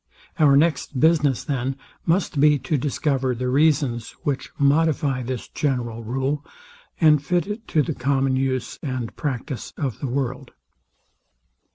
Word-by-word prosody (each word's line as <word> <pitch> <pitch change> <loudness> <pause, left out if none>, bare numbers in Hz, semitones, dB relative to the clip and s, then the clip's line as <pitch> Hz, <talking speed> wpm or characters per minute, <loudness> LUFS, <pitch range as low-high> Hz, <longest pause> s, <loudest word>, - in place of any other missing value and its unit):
Our 140 -3 +6
next 150 -3 +1
business, 150 -4 +3
then, 135 -2 -2 0.3
must 170 -3 +1
be 150 +1 +5
to 130 +4 -2
discover 135 -2 0
the 125 +1 -2
reasons 135 -4 +2
which 140 -2 -2
modify 145 -2 +2
this 125 0 -4
general 120 -6 -2
rule, 135 +5 -2 0.6
and 150 -3 +5
fit 175 +3 +1
it 215 +2 -6
to 155 - +2
the 160 - -2
common 135 0 +1
use 130 -2 -1
and 130 -5 -4
practice 135 -2 -4
of 135 -8 -3
the 140 - -3
world. 130 0 -3
140 Hz, 140 wpm, -23 LUFS, 130-150 Hz, 0.6 s, Our